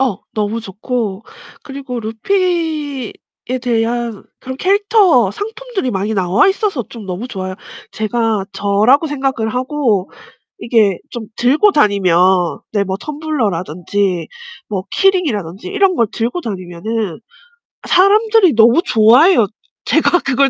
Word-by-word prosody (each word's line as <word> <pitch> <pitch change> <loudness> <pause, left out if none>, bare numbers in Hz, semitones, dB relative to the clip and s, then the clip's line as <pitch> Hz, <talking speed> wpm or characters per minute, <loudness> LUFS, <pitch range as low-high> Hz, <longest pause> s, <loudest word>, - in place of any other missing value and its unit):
어 255 -8 +1 0.2
너무 215 +1 -2
좋고 215 0 -4 0.4
그리고 270 -3 -6
루피에 300 - -2 0.5
대한 235 -2 -1 0.2
그런 260 0 -7
캐릭터 390 - +3
상품들이 435 - -4
많이 205 +2 -2
나와 190 - +3
있어서 390 - -1
좀 225 -4 -10
너무 190 +7 -5
좋아요. 185 -4 -5 0.4
제가 220 -2 -1
저라고 205 +10 +2
생각을 270 -6 -2
하고 250 -7 0 0.5
이게 215 -6 +2
좀 235 -2 -6
들고 295 - +3
다니면 200 - +2 0.6
네 205 -2 +2
뭐 190 -1 -3
텀블러라든지 200 - -2 0.4
뭐 195 -3 -3
키링이라든지 265 - 0
이런 390 -1 +2
걸 230 -7 +2
들고 240 +10 -2
다니면은 190 - -4 0.7
사람들이 420 0 +4
너무 230 +8 +5
좋아해요 235 - +5 0.4
제가 355 - +3
그걸 275 -1 +2
235 Hz, 265 characters per minute, -16 LUFS, 205-310 Hz, 0.7 s, 너무